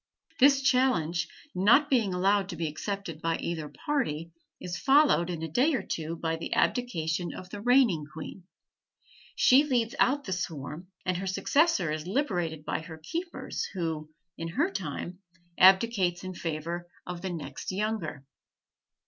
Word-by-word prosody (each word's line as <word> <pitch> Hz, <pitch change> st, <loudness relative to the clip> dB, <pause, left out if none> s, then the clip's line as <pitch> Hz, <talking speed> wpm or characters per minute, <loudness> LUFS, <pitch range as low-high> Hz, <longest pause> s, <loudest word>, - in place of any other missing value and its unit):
This 275 Hz, 0 st, +6 dB
challenge, 175 Hz, -, +2 dB, 0.3 s
not 230 Hz, +11 st, +5 dB
being 235 Hz, -8 st, +2 dB
allowed 195 Hz, +2 st, +2 dB
to 175 Hz, -, -4 dB
be 165 Hz, 0 st, -2 dB
accepted 165 Hz, 0 st, -5 dB
by 165 Hz, 0 st, 0 dB
either 160 Hz, -3 st, -4 dB
party, 170 Hz, -, -2 dB, 0.3 s
is 175 Hz, -1 st, -5 dB
followed, 275 Hz, -, +4 dB
in 165 Hz, -2 st, -4 dB
a -, -, -2 dB
day 265 Hz, -, +2 dB
or -, -, -2 dB
two 160 Hz, +1 st, -4 dB
by 165 Hz, 0 st, -2 dB
the 165 Hz, -, -3 dB
abdication 175 Hz, -8 st, 0 dB
of 180 Hz, 0 st, -9 dB
the 205 Hz, -, -6 dB
reigning 235 Hz, -, +3 dB
queen; 175 Hz, +3 st, -9 dB, 0.9 s
she 265 Hz, +3 st, +6 dB
leads 240 Hz, -5 st, 0 dB
out 285 Hz, +2 st, +3 dB
the 190 Hz, -, -3 dB
swarm, 165 Hz, -1 st, -5 dB, 0.2 s
and 185 Hz, -1 st, 0 dB
her 190 Hz, +1 st, -4 dB
successor 190 Hz, -, +2 dB
is 155 Hz, +2 st, -4 dB
liberated 175 Hz, -, -1 dB
by -, -, -1 dB
her 160 Hz, 0 st, -9 dB
keepers, 335 Hz, -, -4 dB
who, 160 Hz, -4 st, -3 dB, 0.3 s
in 165 Hz, -, -3 dB
her 285 Hz, -, 0 dB
time, 175 Hz, -, -5 dB, 0.4 s
abdicates 190 Hz, -2 st, +5 dB
in 185 Hz, 0 st, -5 dB
favor 170 Hz, +1 st, -4 dB, 0.2 s
of 180 Hz, -1 st, -6 dB
the 190 Hz, -, -3 dB
next 155 Hz, -4 st, -5 dB
younger. 190 Hz, -8 st, -3 dB
180 Hz, 155 wpm, -28 LUFS, 165-240 Hz, 0.9 s, This